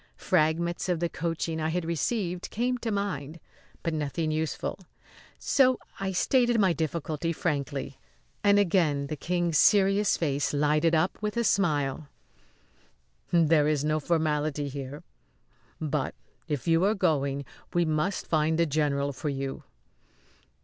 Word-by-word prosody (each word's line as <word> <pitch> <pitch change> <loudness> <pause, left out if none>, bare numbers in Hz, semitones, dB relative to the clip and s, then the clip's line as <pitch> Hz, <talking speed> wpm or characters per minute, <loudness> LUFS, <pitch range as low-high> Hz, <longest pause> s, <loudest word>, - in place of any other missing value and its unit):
Fragments 170 +4 +1
of 175 -2 +1
the 170 0 0
coaching 165 -1 -3
I 155 - 0
had 175 +1 -2
received 175 +2 -2
came 245 +2 -1
to 235 - -3
my 200 -7 -1
mind, 150 +4 -11 0.4
but 165 - -1
nothing 155 +1 -2
useful; 155 +4 -2 0.6
so 260 -2 +3 0.2
I 195 0 -2
stated 240 +5 +2
my 190 -4 +4
difficulty 160 0 -2
frankly, 140 -4 -3 0.4
and 205 -1 +5
again 165 -8 +2
the 155 - -4
King's 175 +1 0
serious 200 0 +4
face 145 -2 -1
lighted 150 +3 +2
up 170 +4 +1
with 210 +1 -2
a 235 - +2
smile. 150 - +1 1.2
"There 160 -3 +4
is 150 -1 +1
no 155 0 +1
formality 150 -2 0
here; 140 +1 -7 0.8
but 150 -3 -2 0.3
if 150 -1 -3
you 165 +1 +4
are 205 +3 +3
going 140 -6 0 0.3
we 175 0 +2
must 155 +5 -1
find 160 0 +1
the 170 - +3
general 140 -2 0
for 150 +3 -4
you." 135 -1 -4
160 Hz, 140 wpm, -28 LUFS, 150-180 Hz, 1.2 s, and